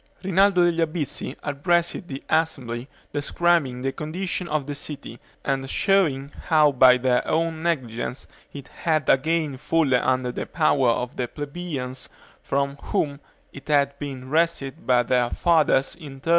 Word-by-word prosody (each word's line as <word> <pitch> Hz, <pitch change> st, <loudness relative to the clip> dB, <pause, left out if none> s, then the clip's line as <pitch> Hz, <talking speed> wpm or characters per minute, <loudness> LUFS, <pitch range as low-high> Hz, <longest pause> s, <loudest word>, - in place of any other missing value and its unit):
Rinaldo 190 Hz, 0 st, +4 dB
degli 170 Hz, -1 st, +1 dB
Albizzi 160 Hz, -2 st, -2 dB
addressed 170 Hz, +5 st, 0 dB
the 135 Hz, -1 st, -7 dB
assembly, 130 Hz, -7 st, -1 dB, 0.3 s
describing 145 Hz, -3 st, +1 dB
the 135 Hz, -, 0 dB
condition 175 Hz, +5 st, -3 dB
of 155 Hz, -3 st, -1 dB
the 145 Hz, -, -4 dB
city, 145 Hz, -4 st, -7 dB, 0.3 s
and 135 Hz, -1 st, -1 dB
showing 150 Hz, -9 st, +1 dB, 0.2 s
how 155 Hz, -3 st, +5 dB
by 130 Hz, -1 st, +6 dB
their 125 Hz, 0 st, +2 dB
own 165 Hz, 0 st, 0 dB
negligence 130 Hz, -7 st, -2 dB, 0.3 s
it 140 Hz, -2 st, -10 dB
had 155 Hz, -4 st, -1 dB
again 155 Hz, 0 st, +2 dB
fallen 150 Hz, -3 st, +2 dB
under 130 Hz, -1 st, 0 dB
the -, -, -5 dB
power 145 Hz, -6 st, +2 dB
of 125 Hz, +1 st, -1 dB
the 125 Hz, -, -1 dB
plebeians, 145 Hz, -3 st, -6 dB, 0.3 s
from 140 Hz, 0 st, -1 dB
whom 140 Hz, -2 st, -1 dB, 0.3 s
it 135 Hz, -, -12 dB
had 140 Hz, -1 st, +2 dB
been 135 Hz, -3 st, -6 dB
wrested 160 Hz, -1 st, -1 dB
by 125 Hz, -1 st, +4 dB
their 120 Hz, 0 st, +1 dB
fathers 155 Hz, -5 st, +2 dB
in 150 Hz, -5 st, -10 dB
1381. 135 Hz, -, -13 dB
145 Hz, 145 wpm, -24 LUFS, 130-165 Hz, 0.3 s, by